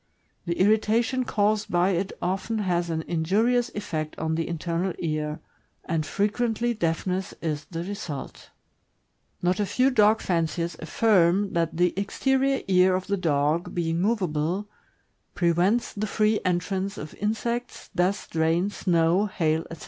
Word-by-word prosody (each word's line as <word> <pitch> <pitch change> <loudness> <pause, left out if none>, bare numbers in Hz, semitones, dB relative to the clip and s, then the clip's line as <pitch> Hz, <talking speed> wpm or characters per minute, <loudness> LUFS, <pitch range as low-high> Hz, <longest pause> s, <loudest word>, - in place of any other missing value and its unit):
The 170 - -2
irritation 220 +5 +2
caused 210 0 +1
by 175 +2 +2
it 190 +2 -1
often 195 +5 -1
has 175 -4 0
an 160 -1 -2
injurious 220 +10 +1
effect 155 -7 -4
on 160 0 -1
the 165 0 -1
internal 170 +2 -2
ear, 155 -2 -3 0.4
and 160 -1 0
frequently 230 +3 0
deafness 185 -1 -2
is 150 -3 -3
the 165 +1 -5
result. 180 -8 -6 0.9
Not 180 +2 +1
a 205 - +2
few 255 +7 +2
dog 215 -2 +4
fanciers 170 -1 -1
affirm 195 +1 +2
that 165 -1 0
the 175 0 +3
exterior 265 +7 +1
ear 185 -1 +4
of 185 0 -2
the 200 - 0
dog, 155 -1 0
being 165 -1 0
movable, 185 -2 0 0.7
prevents 175 +7 +2
the 215 +1 -2
free 215 +1 +2
entrance 190 +2 -1
of 150 - -7
insects, 235 +3 -3
dust, 185 +3 0
rain, 165 +4 +1
snow, 175 +2 +2
hail, 160 -4 0
etc. 165 - -8
185 Hz, 140 wpm, -26 LUFS, 165-210 Hz, 0.9 s, dog